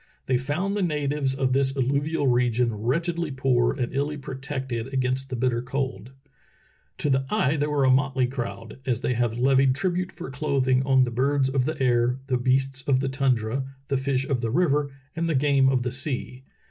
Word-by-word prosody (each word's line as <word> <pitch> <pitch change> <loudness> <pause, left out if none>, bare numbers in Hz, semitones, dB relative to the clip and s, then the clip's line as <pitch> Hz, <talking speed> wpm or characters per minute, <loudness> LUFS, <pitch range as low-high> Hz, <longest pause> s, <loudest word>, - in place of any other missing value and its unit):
They 130 -1 +1
found 170 +10 -2
the 205 - 0
natives 145 -5 0
of 130 -1 0
this 135 0 +1
alluvial 140 +4 0
region 120 -2 +2
wretchedly 165 - -1
poor 130 -3 +2
and 120 0 -2
illy 145 +2 -1
protected 130 -3 -5
against 130 0 -1
the 130 - -3
bitter 120 -1 0
cold. 130 -4 -3 0.9
To 145 - 0
the 135 0 +1
eye 160 -9 +1
they 150 0 0
were 145 -2 +1
a 130 - +5
motley 130 -1 +2
crowd, 115 -3 -6
as 125 -4 -1
they 125 - 0
had 120 -1 0
levied 130 +1 +3
tribute 180 +3 -1
for - - -8
clothing 135 -2 +1
on 130 -1 +5
the 125 - -2
birds 135 +2 +1
of 135 -2 +1
the 155 0 -3
air, 125 -1 +2
the 130 -2 0
beasts 135 +2 +1
of 135 -2 +3
the 135 0 -1
tundra, 130 -2 0 0.3
the 140 - +1
fish 135 0 0
of 130 -4 0
the 115 - -1
river, 145 0 +2 0.3
and 165 0 -1
the 160 - +1
game 135 -1 +3
of 130 -2 +1
the 125 - -2
sea. 130 -1 -3
135 Hz, 195 wpm, -25 LUFS, 125-140 Hz, 0.9 s, a